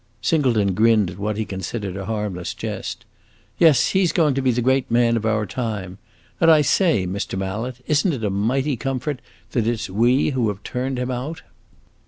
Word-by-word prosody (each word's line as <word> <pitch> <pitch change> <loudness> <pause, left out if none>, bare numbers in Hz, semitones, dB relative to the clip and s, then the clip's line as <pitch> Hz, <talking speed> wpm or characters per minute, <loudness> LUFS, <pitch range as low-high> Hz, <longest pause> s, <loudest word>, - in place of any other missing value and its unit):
Singleton 115 - +2
grinned 110 -2 +3
at 90 - -11
what 105 +1 -2
he 110 - -1
considered 95 0 -5
a 95 0 -5
harmless 105 -5 -3
jest. - - -5 0.5
"Yes, 155 -7 +5
he 190 0 +2
's 175 - +2
going 155 -4 +2
to 135 - -1
be 130 - +2
the 120 0 +1
great 130 +1 +2
man 115 0 +3
of 110 -1 -1
our 110 -1 +1
time! 105 -5 -4 0.4
And 165 - +5
I 155 -2 +6
say, 155 - +2
Mr. 95 +1 -3
Mallet, 110 +7 -4
is 150 -1 +2
n't 175 -7 +1
it 115 - -7
a 105 - 0
mighty 130 +8 0
comfort 135 +1 -3 0.3
that 115 -3 0
it 120 -1 0
's - - -5
we 120 +9 +3
who 125 -4 0
have 105 0 -4
turned 130 +1 -3
him 125 +1 -2
out?" 130 +6 -5
115 Hz, 205 wpm, -22 LUFS, 105-135 Hz, 0.5 s, I